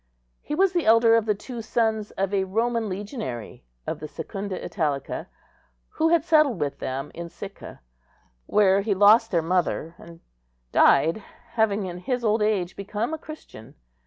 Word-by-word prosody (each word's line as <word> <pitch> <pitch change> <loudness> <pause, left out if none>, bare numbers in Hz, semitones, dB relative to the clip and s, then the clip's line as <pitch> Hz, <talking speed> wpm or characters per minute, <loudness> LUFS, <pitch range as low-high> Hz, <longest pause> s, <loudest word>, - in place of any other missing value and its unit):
He 300 - -4
was 380 +2 +3
the 345 -7 0
elder 230 +1 +6
of 225 -1 +3
the 210 - +2
two 235 +3 -7
sons 220 -1 0
of 195 +1 -1
a 190 -1 +1
Roman 225 +3 -1
legionary 195 - -6 0.2
of - - -4
the 155 - -6
Secunda 195 +3 -5
Italica, 150 -7 -3 0.6
who 320 +1 +1
had 335 -3 +3
settled 305 - +3
with 145 -1 -2
them 135 +2 -4
in 170 0 -7
Sicca, 195 - -10 0.7
where 200 -1 +4
he 205 -1 0
lost 215 +4 +6
their 170 -4 +1
mother, 170 -1 -1
and 170 0 -13 0.5
died, 165 +9 +4 0.3
having 215 -3 +1
in 180 -1 -6
his 245 +6 -2
old 215 0 +2
age 200 -4 0
become 210 +7 -3
a 320 - -4
Christian. 140 - -12
205 Hz, 160 wpm, -25 LUFS, 180-230 Hz, 0.7 s, elder